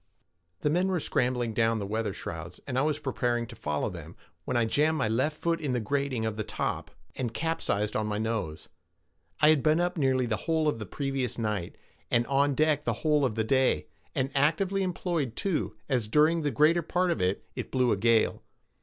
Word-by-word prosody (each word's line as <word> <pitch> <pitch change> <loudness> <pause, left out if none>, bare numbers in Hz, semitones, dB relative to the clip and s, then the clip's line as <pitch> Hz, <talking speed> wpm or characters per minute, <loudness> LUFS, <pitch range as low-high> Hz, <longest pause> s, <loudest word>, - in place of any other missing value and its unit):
The 150 - +1
men 180 +4 +2
were 185 -2 0
scrambling 125 -5 0
down 115 +1 +2
the 100 - -3
weather 110 +1 -1
shrouds, 85 -1 -7
and 130 - -4
I 130 - +3
was 150 0 +1
preparing 125 -4 -1
to - - -11
follow 75 0 -2
them, - - -9 0.3
when 125 - 0
I 120 - +3
jammed 155 +7 +2
my 130 - +1
left 130 +8 0
foot 165 0 0
in 140 -4 -1
the 125 - +1
grating 135 0 -1
of 110 -1 -2
the 110 - -1
top, - - -3 0.3
and 125 -4 -2
capsized 105 -10 -1
on 110 0 0
my 105 -1 -1
nose. 110 -8 -3 0.7
I 150 - +7
had 155 -3 +5
been 155 +3 +3
up 175 0 0
nearly 130 -2 +2
the 110 -2 -1
whole 160 -1 +2
of 145 -6 0
the 110 - -6
previous 135 -2 -2
night, 105 -6 -2 0.3
and 120 0 +2
on 140 +1 +2
deck 155 0 +2
the - - 0
whole 150 -2 +4
of 125 -5 0
the 110 - +1
day, 120 - +2 0.3
and 130 +1 0
actively 175 +8 +2
employed 170 -8 -1
too, 190 -6 -1
as 125 -6 0
during 155 +8 +4
the 150 - 0
greater 155 +7 +4
part 175 +2 0
of 105 - -1
it 90 +2 0
it - - -5
blew 125 -2 +2
a - - +3
gale. 115 +2 +2
130 Hz, 210 wpm, -28 LUFS, 110-155 Hz, 0.7 s, I